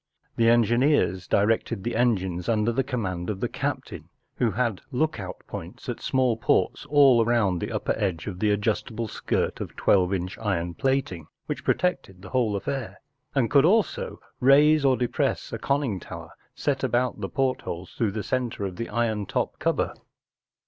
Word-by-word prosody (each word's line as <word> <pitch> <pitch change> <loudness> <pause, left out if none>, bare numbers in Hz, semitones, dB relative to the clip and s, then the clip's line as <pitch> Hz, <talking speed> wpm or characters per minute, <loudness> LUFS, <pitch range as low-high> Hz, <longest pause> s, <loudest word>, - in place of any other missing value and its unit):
The 115 0 +4
engineers 120 - +3
directed 110 0 +1
the 120 - -2
engines 95 -7 0
under 110 0 +2
the 135 +3 0
command 95 -10 -3
of 100 -3 -3
the - - 0
captain, - - -4 0.3
who 120 - +2
had 115 -1 -1
look 155 0 0
out 90 -2 -7
points - - -8
at - - -4
small 130 -3 +1
ports 130 - +1
all 140 -5 +6
round 105 -7 +1
the - - -2
upnef - - -2
edge 85 -4 -1
of 90 -3 -6
the 105 - +2
adjustable 110 +2 -1
skirt - - -2
of - - -6
twelve 90 -2 +3
inch 95 -1 -3
iron 90 -5 -1
plating 130 - -1 0.2
which - - -4
protected 95 - -1
the 95 - -9
whole 115 -4 +1
affair, 130 +5 -4 0.4
and 135 - +4
who 115 - -1
could 140 0 +5
also 215 +4 +1 0.2
raise 145 +3 +5
or 130 -2 +4
depress 125 -1 -1
a - - -3
conning 135 -8 0
tower - - -9 0.2
set 135 -2 -1
about 125 -3 0
the 95 - -3
portholes 130 -9 -2
through 110 -4 -1
the 110 -1 -3
centre 125 -5 -2
of 95 - -4
tlie 115 - -5
iron 110 -4 0
top - - -2
cover. - - 0
115 Hz, 175 wpm, -26 LUFS, 95-130 Hz, 0.4 s, all